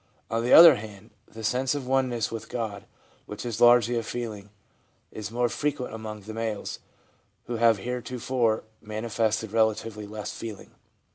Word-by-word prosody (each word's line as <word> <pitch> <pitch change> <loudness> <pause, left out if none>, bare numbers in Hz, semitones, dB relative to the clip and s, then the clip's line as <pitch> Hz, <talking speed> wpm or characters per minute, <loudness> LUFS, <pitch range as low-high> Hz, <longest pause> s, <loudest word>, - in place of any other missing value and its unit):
On 115 +1 0
the 125 - 0
other 165 -5 +10
hand, 105 0 -11 0.2
the 110 0 -10
sense 130 +5 +1
of 140 -3 -4
oneness 125 -4 0
with 115 -1 -6
God, 110 -4 -4 0.4
which 105 +3 -7
is 115 -4 -4
largely 120 0 +6
a 115 - +1
feeling, 110 -4 -6 0.6
is 105 -2 -6
more 120 +2 +1
frequent 140 -1 -3
among 110 -1 -7
the 110 +2 -9
males, 110 -2 -4 0.7
who 120 - -3
have 115 -1 +4
heretofore 125 0 -1 0.2
manifested 110 0 -2
relatively 110 -1 0
less 105 0 -6
feeling. 110 -3 -8
115 Hz, 150 wpm, -26 LUFS, 110-120 Hz, 0.7 s, other